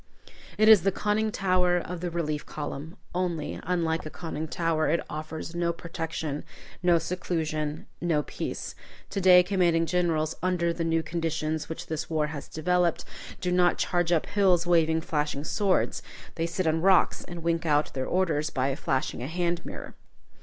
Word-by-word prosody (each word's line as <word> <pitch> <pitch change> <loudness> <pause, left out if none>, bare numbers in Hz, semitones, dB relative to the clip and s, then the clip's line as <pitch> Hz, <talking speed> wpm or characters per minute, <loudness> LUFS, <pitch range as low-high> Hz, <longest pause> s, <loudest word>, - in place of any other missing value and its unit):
It 215 - +4
is 220 -4 +9
the 195 - +2
conning 210 +2 0
tower 185 -2 +2
of 175 0 -4
the 175 +1 -2
relief 155 -3 -2
column, 150 +4 -6 0.2
only, 175 -4 -2
unlike 165 -2 0
a 155 - -6
conning 160 -1 -5
tower, 160 -1 0
it 165 +2 +2
offers 155 +2 -5
no 170 0 0
protection, 165 -3 -4 0.4
no 175 -2 +4
seclusion, 160 -3 -2 0.2
no 165 -4 +1
peace. - - -5 0.4
To 195 - -1
day, 180 -1 +8
commanding 175 -3 +2
generals, 165 -3 0
under 175 -1 +1
the 165 - -3
new 165 0 +1
conditions 160 -2 -2
which 160 - -5
this 160 0 -4
war 155 -2 +1
has 145 -1 -7
developed, 175 +1 +1 0.4
do 180 - 0
not 180 0 +3
charge 175 -1 0
up 165 -3 +2
hills 190 -4 +3
waving 160 -2 +3
flashing 150 -2 -2
swords. 195 +4 +1 0.3
They 165 0 -1
sit 175 +2 -2
on 160 0 +2
rocks, 190 0 +4
and 175 -1 -8
wink 165 0 0
out 150 0 +2
their 130 -1 -2
orders 160 -5 +1
by 135 -1 0
a 135 - -1
flashing 135 -1 -1
hand 170 +6 -1
mirror. - - -8
165 Hz, 165 wpm, -27 LUFS, 155-180 Hz, 0.4 s, is